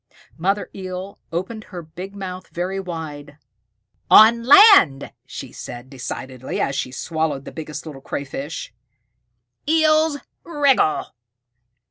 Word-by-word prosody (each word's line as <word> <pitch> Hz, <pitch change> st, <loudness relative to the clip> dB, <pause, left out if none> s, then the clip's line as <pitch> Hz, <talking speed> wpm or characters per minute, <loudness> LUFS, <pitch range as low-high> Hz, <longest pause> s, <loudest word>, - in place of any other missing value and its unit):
Mother 195 Hz, +5 st, -1 dB
Eel 185 Hz, 0 st, -7 dB
opened 190 Hz, +6 st, -4 dB
her 175 Hz, -3 st, -8 dB
big 180 Hz, +5 st, -9 dB
mouth 185 Hz, -2 st, -7 dB
very 185 Hz, +3 st, -3 dB
wide. 155 Hz, -5 st, -7 dB, 0.7 s
"On 230 Hz, +2 st, +8 dB
land," 280 Hz, -, +7 dB
she -, -, -8 dB
said 120 Hz, +2 st, -9 dB
decidedly, 130 Hz, -1 st, -6 dB
as 135 Hz, -, 0 dB
she 130 Hz, -, -3 dB
swallowed 155 Hz, 0 st, -2 dB
the -, -, -8 dB
Biggest 150 Hz, -1 st, -7 dB
Little 145 Hz, -4 st, -9 dB
Crayfish, 140 Hz, 0 st, -6 dB, 1.0 s
"Eels 310 Hz, -1 st, +3 dB, 0.3 s
wriggle." 280 Hz, -, +1 dB
175 Hz, 110 wpm, -21 LUFS, 145-215 Hz, 1.0 s, On